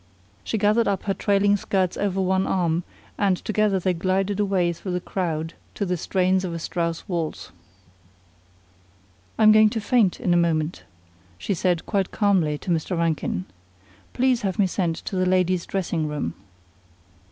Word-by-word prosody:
She 220 - -2
gathered 215 +3 +3
up 200 -1 -1
her 195 - 0
trailing 200 0 +2
skirts 190 -2 0
over 195 -2 -1
one 190 0 +1
arm, 170 -2 0 0.4
and 195 -3 +2
together 215 -2 +1
they 185 0 0
glided 190 +3 0
away 190 -4 +1
through 180 +2 -6
the 180 - 0
crowd 165 -3 -3 0.2
to 200 - -1
the 180 -1 0
strains 185 +2 +1
of 175 -2 -3
a - - -2
Strauss 165 0 -3
waltz. 165 - -4 1.9
"I'm 215 -1 +7
going 215 0 +6
to 225 - -3
faint 215 -4 +2
in 175 - +1
a - - +4
moment," 165 -1 0 0.5
she 145 - -2
said 175 -1 0
quite 195 -3 0
calmly 185 -8 +1
to 180 - -4
Mr. 170 +2 -1
Rankin. 160 - -1 0.7
"Please 255 -1 +2
have 190 -3 -2
me 205 - +4
sent 175 -3 -1
to - - -4
the 185 0 +1
ladies' 185 -1 +1
dressing 170 -5 -1
room." 145 - -3
185 Hz, 165 wpm, -24 LUFS, 170-200 Hz, 1.9 s, I'm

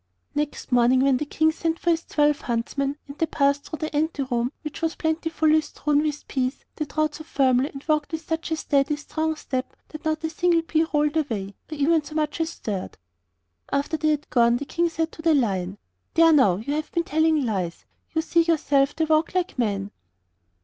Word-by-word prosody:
Next 295 -2 -3
morning, 250 +1 +4
when 270 -1 +4
the 300 - -3
King 315 +2 +2
sent 325 0 -2
for 345 - +1
his 330 0 0
twelve 295 -1 +1
huntsmen, 275 +4 -2
and 280 - -9
they 325 - +2
passed 280 -2 +1
through 315 - -6
the 310 -1 -4
ante 300 -1 0
room 245 -1 -1
which 300 +1 -6
was 325 -1 0
plentifully 320 -1 +2
strewn 295 -1 0
with 300 -1 -3
peas, 260 0 -2
they 305 - -2
trod 305 +1 -1
so 310 - -8
firmly 270 -3 +2
and 275 0 -10
walked 305 -1 +1
with 320 0 -5
such 320 0 -2
a 320 - +1
steady, 285 -1 +1
strong 315 +2 -2
step 260 -4 -4
that 310 - -9
not 315 0 -1
a 320 - 0
single 335 0 +2
pea 320 0 +1
rolled 300 0 +2
away 210 -10 -2 0.2
or - - -3
even 305 +2 +2
so 305 +1 -10
much 305 +1 -1
as 325 - 0
stirred. 205 - -5 0.7
After 280 +3 0
they 310 0 +2
were 290 - -9
gone 235 -3 +4
the 285 - -5
King 340 +4 0
said 325 0 -2
to - - -10
the 320 -1 +4
Lion: 195 -7 0 0.4
'There 330 0 +6
now 235 -12 +5
you 225 +9 -3
have 305 0 -3
been 340 - 0
telling 315 -3 +2
lies 185 -7 -3 0.3
you 320 - +2
see 335 +1 +3
yourself 290 -4 +2
they 320 - +1
walk 315 +3 +1
like 360 -7 -1
men. 200 -3 -1
300 Hz, 210 wpm, -24 LUFS, 270-320 Hz, 0.7 s, There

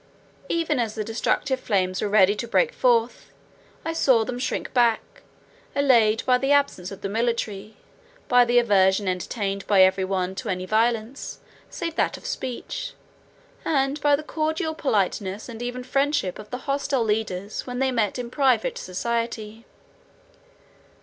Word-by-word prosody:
Even 325 -5 0
as 225 -3 -1
the 215 - -2
destructive 245 +4 -1
flames 185 -5 0
were 210 - -1
ready 200 -1 +5
to 235 +3 -5
break 480 - +2
forth, 235 -2 +1 0.6
I 325 - -1
saw 260 -8 +3
them 245 +1 -4
shrink 255 - -3
back; 235 -3 +1 0.5
allayed 230 -6 +3
by 250 -1 +4
the 270 +2 0
absence 280 -11 +2
of 195 0 -10
the - - -2
military, 215 -1 -2 0.5
by 245 -1 +6
the 240 0 +2
aversion 200 -4 +3
entertained 195 +2 -3
by 195 -2 +6
every 190 0 +3
one 185 -1 -1
to - - -4
any 185 0 -2
violence, 225 +4 -1 0.3
save 335 -2 -4
that - - +1
of - - -15
speech, - - -5 0.7
and 275 -1 0
by 290 -1 +4
the 300 - -6
cordial 315 +1 -2
politeness 205 -7 -1
and 235 -2 -8
even 245 +1 -4
friendship 275 -7 0
of 210 0 -10
the 250 +3 -7
hostile 275 -2 0
leaders 210 -2 -2
when 250 0 -4
they 265 0 +1
met 225 -4 0
in 245 -1 -5
private 260 -6 +1
society. 230 +2 -3
235 Hz, 155 wpm, -24 LUFS, 205-265 Hz, 0.7 s, by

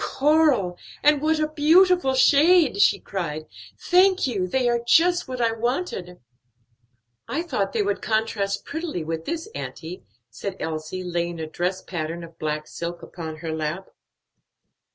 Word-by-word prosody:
"Coral! 275 - +2 0.2
and 295 -1 +4
what 315 +1 +2
a 310 0 +1
beautiful 320 0 +4
shade!" 295 - +5
she - - +4
cried. 155 -5 -4 0.3
"Thank 370 +1 +4
you; 200 -8 -1
they 250 +6 +1
are 240 0 +2
just 345 +8 +3
what 255 -1 -5
I 230 -1 +2
wanted." 225 - -3 1.1
"I 320 +4 -2
thought 200 - -2
they 220 - 0
would 200 0 -1
contrast 215 -2 -1
prettily 315 - -4
with 160 +1 -4
this, 335 +4 -4
auntie," 170 - -7 0.3
said 190 - -6
Elsie, 160 +3 -4
laying 175 -1 -3
a 160 - -3
dress 180 +4 -3
pattern 170 -1 -4
of 165 0 -13
black 150 0 -2
silk 170 +2 -6
upon 160 -2 -7
her 160 - -2
lap. 160 +4 -4
205 Hz, 150 wpm, -24 LUFS, -, 1.1 s, shade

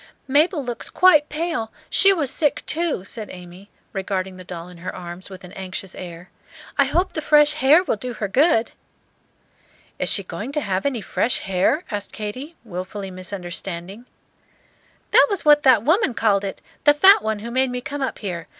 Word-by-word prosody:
"Mabel 295 +2 +2
looks 240 -2 -5
quite 330 -5 +5
pale; 305 -8 -3 0.2
she 390 - +5
was 305 -9 0
sick, 295 -4 0
too," 320 - -2
said 215 0 -7
Amy, 180 +2 -12 0.2
regarding 190 -1 -3
the 185 - -10
doll 175 -1 -8
in 180 -1 -13
her 180 - -6
arms 175 +2 -8
with 190 -1 -11
an 180 - -11
anxious 190 0 -7
air. 175 0 -9 0.4
"I - - +4
hope 370 +2 0
the 310 - -3
fresh 300 0 +4
h'air 300 +7 +6
will - - 0
do 250 +3 -5
her 210 -2 -3
good." 250 - +3 1.3
"Is - - +1
she 200 - +2
going 205 +10 -6
to 300 - 0
have 195 +1 -1
any 255 -5 -2
fresh 240 - 0
hair?" 195 - +1
asked 205 -2 -5
Katy, 255 +10 -6
wilfully 190 -1 -6
misunderstanding. 185 +3 -6 1.0
"That - - +6
was 400 -5 -3
what 295 0 +6
that 255 -6 +5
woman 315 - +2
called 205 -3 +2
it, 195 - -5 0.2
the 290 0 +6
fat 385 +7 +7
one 220 0 -1
who 230 +3 -7
made 260 +1 +1
me 250 0 -3
come 280 +3 -6
up 265 - -2
here. 175 -6 -5
220 Hz, 185 wpm, -22 LUFS, 185-295 Hz, 1.3 s, fat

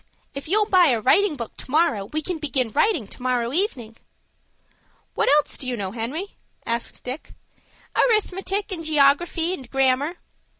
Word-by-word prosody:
If 275 +1 -7
you'll 420 +5 +3
buy 370 -4 +5
a 240 -5 +2
writing 335 - +3
book 235 -5 -7
to - - -10
morrow, 290 -9 +2
we 310 0 -2
can 350 0 -3
begin 260 -6 -1
writing 360 - +2
to 200 - -12
morrow 250 -1 0
evening." 250 - -2 1.2
"What - - +1
else 300 - -1
do 260 - -5
you 250 -1 -2
know, 195 -3 -3
Henry?" 260 - -5 0.3
asked 230 0 -3
Dick. 255 +5 -7 0.6
"Arithmetic, 400 -3 +1
and 340 -3 -4
geography, 315 +3 +2
and 260 -9 -8
grammar." 270 +4 +1
290 Hz, 160 wpm, -23 LUFS, 245-355 Hz, 1.2 s, buy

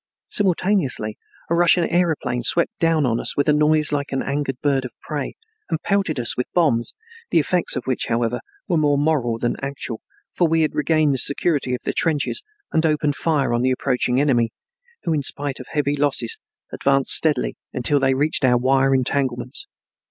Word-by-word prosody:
Simultaneously 185 - +1 0.3
a - - -1
Russian 175 +1 +4
aeroplane 160 -8 0
swept 170 +7 +1
down 165 -3 +2
upon 115 -2 0
us - - 0
with 145 - +1
a 150 - +4
noise 150 0 +3
like 145 -1 -2
an 135 - -1
angered 140 -2 -3
bird 140 -3 +1
of 125 -3 -9
prey 145 -3 -5 0.3
and 160 - -1
pelted 195 -8 0
us 120 - +3
with 125 - -3
bombs, 140 -10 +1 0.3
the - - +2
effects 175 +3 +2
of - - -3
which, 130 -2 -2
however, 115 +1 -1 0.3
were 175 - +1
more 145 -2 +2
moral 140 -6 0
than 120 +1 -2
actual, 140 -4 -5 0.3
for 175 - +2
we 165 0 +2
had 155 - -1
regained 155 -1 +2
the 135 - -2
security 140 -2 0
of - - -9
the - - -2
trenches 160 - 0 0.3
and 160 - +1
opened 150 -2 +1
fire 150 -7 0
on 120 - +1
the 130 - +2
approaching 125 -1 0
enemy, 125 -5 +2 0.5
who 165 - 0
in 150 - 0
spite 140 0 -1
of 130 - -9
heavy 145 -1 0
losses 140 -5 0 0.4
advanced 135 -1 +2
steadily 150 -5 +3 0.2
until 140 +3 +3
he 135 -1 +2
reached 145 +3 +1
our 125 -1 +4
wire 135 +2 +2
entanglements. 130 - -2
140 Hz, 185 wpm, -21 LUFS, 130-155 Hz, 0.5 s, Russian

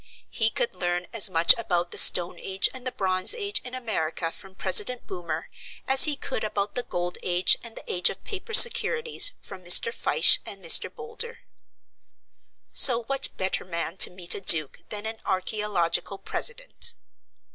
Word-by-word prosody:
He 220 -2 +1
could 480 - -4
learn 175 0 -4
as 215 -3 +4
much 165 -1 +4
about 175 -5 -3
the - - +2
stone 175 0 +5
age 195 0 0
and 260 -1 -8
the - - -4
bronze 185 - +1
age, 405 -3 -2
in 250 0 -8
America, 165 -9 -5
from 190 +2 -15
President 205 +7 0
Boomer, 170 -3 -8 0.4
as 265 0 +6
he 300 -2 0
could 245 - -7
about 205 -1 -5
the 245 - -4
gold 175 -5 -6
age 180 0 +2
and 230 -1 -11
the - - -11
age 180 0 -1
of - - -10
paper 425 +1 -9
securities 475 0 +4
from 190 -2 -13
Mr. 180 - +5
Fyshe 475 - +2
and - - -11
Mr. - - +4
Boulder. 460 +1 -8 1.3
So 240 -2 +5
what 275 +3 +1
better 190 0 -3
man 170 -1 -7
to - - +6
meet 180 -1 -3
a - - -7
duke 155 -6 +3
than 210 0 -6
an 220 0 -7
archaeological 190 -2 -3
president? - - -2
200 Hz, 170 wpm, -23 LUFS, 180-260 Hz, 1.3 s, as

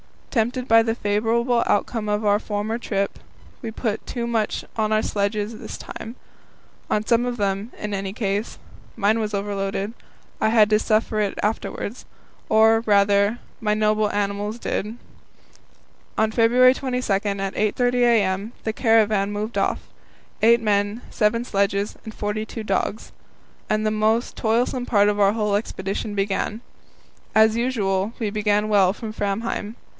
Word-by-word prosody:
Tempted 245 +1 0
by 225 0 +6
the 225 0 -1
favourable 235 +3 +1
outcome 215 +1 0
of 210 +1 0
our 205 0 +4
former 215 +2 -3
trip, 200 -4 -2 0.4
we 230 - -4
put 220 -1 -3
too 240 -2 -3
much 225 -3 -1
on 215 -1 +1
our 215 - +3
sledges 210 +1 -2
this - - -7
time 225 +2 -8 0.7
on 210 0 0
some 235 +1 +2
of 245 -1 -2
them, 200 +1 -2
in 210 -1 -4
any 195 -1 -3
case. 205 0 -2 0.4
Mine 220 +1 +2
was 215 -1 -2
overloaded. 200 +1 -2 0.5
I 220 - +2
had 220 -2 +5
to 215 0 +4
suffer 220 0 +1
for 215 - -1
it 205 -2 -1
afterwards 215 +2 -3 0.4
or, 220 +1 +5
rather, 200 +2 +3 0.2
my 210 -2 +1
noble 215 0 +2
animals 205 +2 -2
did. 220 -1 -3 1.2
On 220 0 +2
February 245 +3 +5
22, 255 -4 -3
at 195 - +1 0.3
8.30 245 +4 +1
a.m., 220 -3 +2
the 220 - -2
caravan 215 -4 +3
moved 215 +3 -3
off - - 0 0.6
eight 235 +1 +5
men, 205 +1 0
seven 230 +2 +1
sledges, 200 -2 -1
and 220 - -7
forty 210 +1 -3
two 220 0 -7
dogs 205 +1 -2 0.6
and 215 0 +1
the 215 - +2
most 220 +2 +1
toilsome 245 +2 0
part 205 -3 +3
of 205 0 -1
our 200 0 +4
whole 210 -2 0
expedition 205 0 -3
began. 200 +2 -1 0.7
As 220 +1 +5
usual, 210 -4 0
we 220 -3 -2
began 210 0 +1
well 195 -3 +4
from 220 0 -7
Framheim. 210 +1 -3
215 Hz, 150 wpm, -23 LUFS, 205-225 Hz, 1.2 s, by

